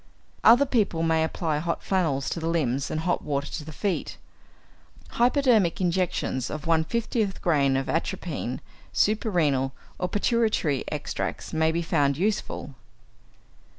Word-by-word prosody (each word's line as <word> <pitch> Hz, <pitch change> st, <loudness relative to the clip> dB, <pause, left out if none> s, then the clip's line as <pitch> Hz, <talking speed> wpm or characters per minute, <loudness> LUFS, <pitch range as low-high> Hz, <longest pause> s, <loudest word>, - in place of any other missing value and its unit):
Other 245 Hz, +5 st, +7 dB
people 210 Hz, -10 st, +1 dB
may 160 Hz, -1 st, +2 dB
apply 160 Hz, -2 st, -1 dB
hot 170 Hz, +2 st, -2 dB
flannels 160 Hz, -8 st, 0 dB
to -, -, -2 dB
the 165 Hz, -, -3 dB
limbs 140 Hz, -5 st, 0 dB
and 155 Hz, -, -2 dB
hot 175 Hz, +2 st, 0 dB
water 140 Hz, -1 st, -2 dB
to 155 Hz, -, -5 dB
the 155 Hz, -, -9 dB
feet. 190 Hz, +5 st, -2 dB, 0.9 s
Hypodermic 240 Hz, -, +3 dB
injections 175 Hz, -8 st, 0 dB
of 155 Hz, -1 st, -6 dB
1/50 195 Hz, +6 st, 0 dB
grain 140 Hz, -5 st, +2 dB
of 135 Hz, -, -2 dB
atropine, 155 Hz, -5 st, -3 dB, 0.3 s
suprarenal 160 Hz, -, +1 dB, 0.3 s
or 180 Hz, -, -1 dB
pituitary 210 Hz, -, +1 dB
extracts, 150 Hz, +2 st, -4 dB
may 160 Hz, 0 st, +2 dB
be 170 Hz, +1 st, -1 dB
found 145 Hz, -4 st, +1 dB
useful. 200 Hz, -7 st, -2 dB
165 Hz, 130 wpm, -26 LUFS, 150-195 Hz, 0.9 s, Other